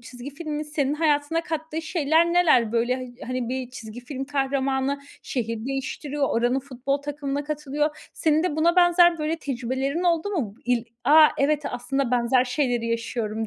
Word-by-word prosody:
çizgi 245 +3 -9
filmin 305 -1 -4
senin 295 -2 -1
hayatına 300 0 +1
kattığı 320 0 -4
şeyler 325 0 +2
neler? 305 -11 +4
Böyle 235 +2 +1
hay 255 -1 -7
hani 255 -2 -2
bir 255 -1 -3
çizgi 225 -1 -9
film 265 +2 -6
kahramanı 275 0 0 0.2
şehir 230 -2 -3
değiştiriyor, 275 +1 -2
oranın 245 +3 +1
futbol 270 +1 -2
takımına 285 0 -3
katılıyor. 300 0 -3
Senin 315 0 +2
de 315 -4 -1
buna 340 +3 +3
benzer 350 -1 +5
böyle 310 +1 -1
tecrübelerin 270 +2 -2
oldu 345 +1 +1
mu? 260 - -2
Bu - - -25
il 240 -1 +1 0.2
a, 305 +3 +8
evet, 295 +2 +2
aslında 245 +1 -2
benzer 245 +1 +3
şeyleri 250 -3 0
yaşıyorum 230 -1 -2
275 Hz, 160 wpm, -24 LUFS, 245-305 Hz, 0.2 s, a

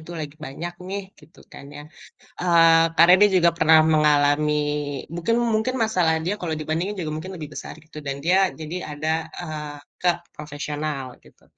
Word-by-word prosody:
itu 155 - -12
lagi 145 -1 -6
banyak 170 +6 -6 0.2
nih, 200 +1 -4 0.2
gitu 150 +3 -20
kan - - -11
ya. 145 - -8 0.6
Eee, 165 -2 +5
karena 170 +2 +7
dia 205 - +7
juga 170 -2 +5
pernah 160 -1 +6
mengalami 150 -1 +3 0.6
mungkin 175 +7 0 0.2
mungkin 220 +4 0
masalah 180 -7 +1
dia 185 - 0
kalau 165 -3 -2
dibandingin 160 +6 -2
juga 155 - -4
mungkin 185 +4 -7
lebih 155 -3 -7
besar, - - -7
gitu, 155 0 -15
dan 140 -1 -3
dia 180 +3 +3 0.2
jadi 160 +2 -7 0.2
ada, 150 +2 -3 0.3
eee, 150 -3 -6 0.3
ke 180 - +3 0.3
profesional, 145 -3 -5
gitu. - - -22
160 Hz, 165 wpm, -23 LUFS, 150-175 Hz, 0.6 s, karena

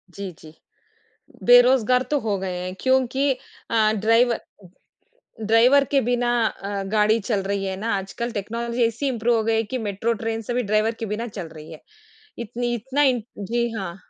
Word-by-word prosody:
जी, 195 +1 -7
जी, 155 -1 -14 0.9
बेरोज़गार 250 0 +5
तो 295 - +2
हो 210 -5 -1
गए 185 -1 -4
हैं 185 0 -5
क्योंकि 265 +1 +2 0.4
अ, 220 -2 +3
ड्राइवर 230 +3 +3 1.1
ड्राइवर 245 +6 +5
के 275 -1 +4
बिना 245 0 0 0.2
अ, 200 -1 -5
गाड़ी 215 +1 +3
चल 205 -1 -1
रही 195 0 -2
है 190 0 -3
ना 225 +1 -1
आजकल 195 +5 -5
टेक्नोलॉज़ी 235 +3 -2
ऐसी 230 +5 -2
इम्प्रूव 240 -2 +1
हो 220 - 0
गई 225 0 +1
है 225 - +1
कि - - +1
मेट्रो 205 +4 -1
ट्रेन 225 0 -2
सभी 245 +1 0
ड्राइवर 215 +2 +1
के 225 - -3
बिना 230 +2 -4
चल 195 -6 -7
रही 155 -1 -12
है 155 - -13 0.6
इतनी 240 +1 -3
इतना, 265 +5 -1
इन 250 -5 +2 0.2
जी, 235 +4 -1
हाँ। 180 -4 -5
225 Hz, 175 wpm, -23 LUFS, 205-245 Hz, 1.1 s, बेरोज़गार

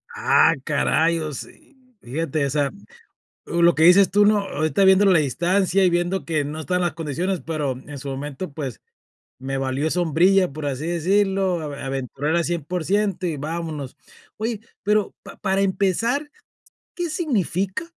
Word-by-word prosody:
Ah, 165 - +4
caray, 160 +3 +1
o 155 -1 -4
se 280 - -11 0.3
fíjate, 150 +3 -2
o - - -1
sea, 140 0 0 0.8
lo 170 0 +3
que 160 - +4
dices 180 +2 +7
tú, 205 +2 +4
¿no?, 210 0 +4
ahorita 195 0 0
viendo 190 +1 +6
la 190 -4 +5
distancia 180 +6 +1
y 180 - +4
viendo 175 +2 0
que 155 -3 -1
no 150 +2 -5
están 180 +3 -1
las 175 -4 0
condiciones, 170 +4 -2
pero 155 -4 -1
en 145 -1 -8
su 140 - -7
momento, 140 +5 -5
pues, 140 -5 -6 0.6
me 135 +1 -3
valió 135 +3 -1
sombrilla, 180 +2 +3
por 150 +1 -6
así 140 +1 -3
decirlo, 190 +1 +1
aventurar 140 0 -3
al 170 - +2
100% 180 +5 -1
y 165 -4 -2
vámonos. 155 -2 -5 0.4
Oye, 220 0 -3 0.2
pero 210 0 +1
pa - - -12
para 195 -1 0
empezar, 210 - 0 0.7
¿qué 350 -1 -2
significa 210 - -1
170 Hz, 155 wpm, -22 LUFS, 150-195 Hz, 0.8 s, dices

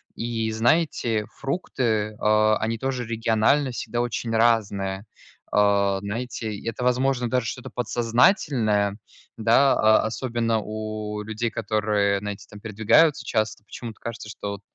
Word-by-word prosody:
И, 115 -1 -2
знаете, 115 -2 +1
фрукты, 120 - -1
а, 110 0 +3
они 115 +1 -1
тоже 130 0 -3
регионально 115 +5 +1
всегда 120 0 -3
очень 120 -1 -3
разные, 100 -4 +1 0.5
а. 100 -1 +3
Знаете, 110 +2 -4
и 100 - -8
это, 120 +2 -5
возможно, 125 0 +1
даже 125 -1 0
что-то 125 - -5
подсознательное, 115 - +1 0.4
да, 115 +5 +4
о 110 0 +4
особенно 115 -1 -1
у 110 0 -5
людей, 110 +2 -3
которые, 105 -2 0
знаете, 105 0 -6
там 105 - -11
передвигаются 110 +7 +3
часто, 110 -2 -1
почему-то 110 +1 -9
кажется, 115 -2 -6
что 105 -1 -6
вот 100 - -7
110 Hz, 130 wpm, -24 LUFS, 105-120 Hz, 0.5 s, да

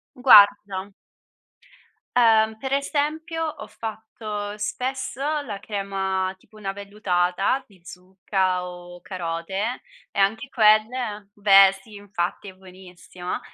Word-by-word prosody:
Guarda 205 -5 +5 1.3
Uhm, 220 -2 +4
per 265 +4 -4
esempio 310 +4 -1
ho 305 -2 -6
fatto 215 -2 -6
spesso 260 +4 -4 0.2
la 210 -8 -6
crema, 195 -2 -2
tipo 215 - -21
una 195 -2 -4
vellutata 200 +3 -1
di 195 -3 -22
zucca 185 0 -2
o 175 0 -11
carote 185 +6 -4 0.3
e - - -4
anche 220 +7 +1
quelle 215 -2 +2
beh, 195 -1 +6
sì, 215 +2 -17
infatti 200 -1 -4
è - - -12
buonissima! 185 -1 -9
205 Hz, 105 wpm, -23 LUFS, 190-225 Hz, 1.3 s, beh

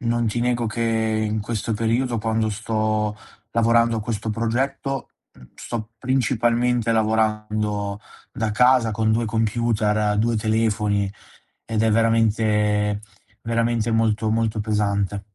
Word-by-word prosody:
non 120 -1 0
ti 120 +2 -1
nego 120 -1 0
che 110 +2 -4 0.5
in 110 0 -1
questo 115 +1 -3
periodo, 115 +2 0
quando 110 0 0
sto 110 0 -1 0.4
lavorando 115 0 +3
a - - -3
questo 110 0 -3
progetto, 130 +4 -2 0.3
mhmm, 65 -1 -15
sto 115 -1 -6
principalmente 120 -2 +1
lavorando 105 -2 0 0.3
da 110 -1 -2
casa 125 +1 +4
con 110 +1 +1
2 115 +1 +1
computer, 110 -1 +1
2 115 +1 +1
telefoni 105 -2 0 0.5
ed 110 -1 -1
è 110 - +3
veramente 105 -2 +2 0.4
veramente 115 0 0
molto, 110 -1 +1
molto 110 -1 0
pesante. 100 -2 0
110 Hz, 120 wpm, -22 LUFS, 105-115 Hz, 0.5 s, casa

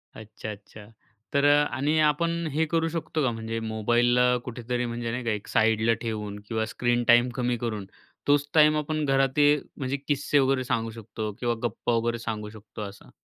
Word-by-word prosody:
अच्छा, 110 0 -8
अच्छा. 105 +1 -12 0.5
तर 140 0 +3
अ 145 0 +6
आणि 145 +4 +1
आपण 165 +3 +1 0.2
हे 160 +2 +2
करू 165 -1 +2
शकतो 160 -1 -2
का 130 - +2
म्हणजे 115 0 -4
मोबाईलला 120 +3 +2 0.2
कुठेतरी 120 0 -3
म्हणजे 120 0 -3
नाही 125 +2 -3
का 115 - 0
एक 105 -1 -4
साईडला 110 +1 +3
ठेवून 105 -3 -4
किंवा 110 0 -1
स्क्रीन 120 0 +1
टाईम 120 +1 +6
कमी 125 -1 0
करून 110 -4 -3 0.4
तोच 145 0 +3
टाईम 155 -1 +6
आपण 155 +1 -1
घरात 135 -1 +3
ते 145 -1 +6 0.3
म्हणजे 135 0 -2
किस्से 145 0 +2
वगैरे 135 -1 +2
सांगू 115 -2 -1
शकतो 110 0 -5
किंवा 120 -1 0
गप्पा 120 +1 -1
वगैरे 115 +1 0
सांगू 110 -2 -4
शकतो 110 0 -11
असं? 100 -1 -9
120 Hz, 180 wpm, -26 LUFS, 110-140 Hz, 0.5 s, अ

